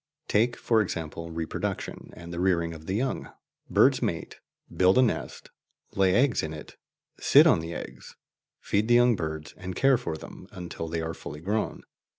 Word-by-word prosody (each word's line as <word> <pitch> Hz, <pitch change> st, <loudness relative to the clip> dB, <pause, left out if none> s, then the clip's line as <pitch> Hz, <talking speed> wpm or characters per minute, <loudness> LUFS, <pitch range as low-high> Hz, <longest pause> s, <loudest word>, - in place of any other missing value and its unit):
Take, 120 Hz, +3 st, +2 dB
for 115 Hz, -2 st, +2 dB
example, 85 Hz, -3 st, -4 dB
reproduction 80 Hz, -1 st, -4 dB
and 85 Hz, 0 st, -9 dB
the 85 Hz, -, -4 dB
rearing 85 Hz, -3 st, +1 dB
of 80 Hz, 0 st, -11 dB
the 95 Hz, -, -1 dB
young. 130 Hz, +5 st, -2 dB, 0.4 s
Birds -, -, +4 dB
mate, -, -, -3 dB, 0.4 s
build 95 Hz, +3 st, +4 dB
a 130 Hz, -, +7 dB
nest, 120 Hz, -, -3 dB, 0.4 s
lay 95 Hz, -1 st, +3 dB
eggs 125 Hz, -3 st, +3 dB
in 80 Hz, 0 st, -4 dB
it, 75 Hz, -, -11 dB, 0.4 s
sit -, -, +6 dB
on -, -, +5 dB
the 80 Hz, +1 st, -5 dB
eggs, 65 Hz, +1 st, -9 dB, 0.4 s
feed 105 Hz, +2 st, 0 dB
the 120 Hz, -, +5 dB
young 120 Hz, -1 st, +5 dB
birds, 80 Hz, -3 st, -5 dB
and 95 Hz, -1 st, -6 dB
care 135 Hz, +1 st, +4 dB
for 85 Hz, -10 st, -4 dB
them 90 Hz, -, -11 dB
until 90 Hz, -4 st, -6 dB
they 80 Hz, 0 st, -2 dB
are 80 Hz, 0 st, -3 dB
fully 75 Hz, -2 st, -8 dB
grown. 105 Hz, +6 st, -2 dB
90 Hz, 175 wpm, -27 LUFS, 80-110 Hz, 0.4 s, a